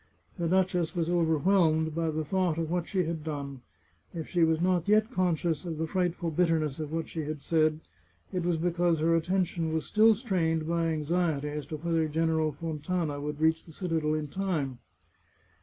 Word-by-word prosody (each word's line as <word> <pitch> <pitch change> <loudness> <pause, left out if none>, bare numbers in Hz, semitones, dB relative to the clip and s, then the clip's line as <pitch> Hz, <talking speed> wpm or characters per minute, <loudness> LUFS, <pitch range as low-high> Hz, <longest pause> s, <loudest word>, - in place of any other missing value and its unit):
The 170 - 0
duchess 180 -2 +1
was 170 -1 0
overwhelmed 160 -1 +2
by 165 0 0
the 155 0 -2
thought 180 0 0
of 165 -1 -2
what 175 -1 -1
she 190 -3 0
had 165 -2 -4
done. 140 -4 -5 0.5
If 160 -2 -4
she 175 -2 +2
was 160 -1 +3
not 180 0 +1
yet 215 +3 +3
conscious 175 - 0
of 165 -3 -4
the 160 - -1
frightful 175 0 -1
bitterness 160 -3 +1
of 155 -1 -4
what 165 0 -2
she 165 - -6
had 155 0 -4
said, 155 +1 +1 0.5
it 180 - 0
was 175 -1 +1
because 175 0 +1
her 165 +2 +2
attention 170 -1 0
was 160 0 -1
still 220 +1 +5
strained 165 -8 0
by 170 0 +1
anxiety 155 -1 0
as 150 -1 -5
to 155 - -5
whether 165 0 0
General 160 0 +1
Fontana 155 0 -3
would 150 0 -4
reach 160 +1 +2
the 165 - -14
citadel 160 -4 -1
in 155 -1 -2
time. 150 -8 -2
165 Hz, 185 wpm, -29 LUFS, 155-175 Hz, 0.5 s, still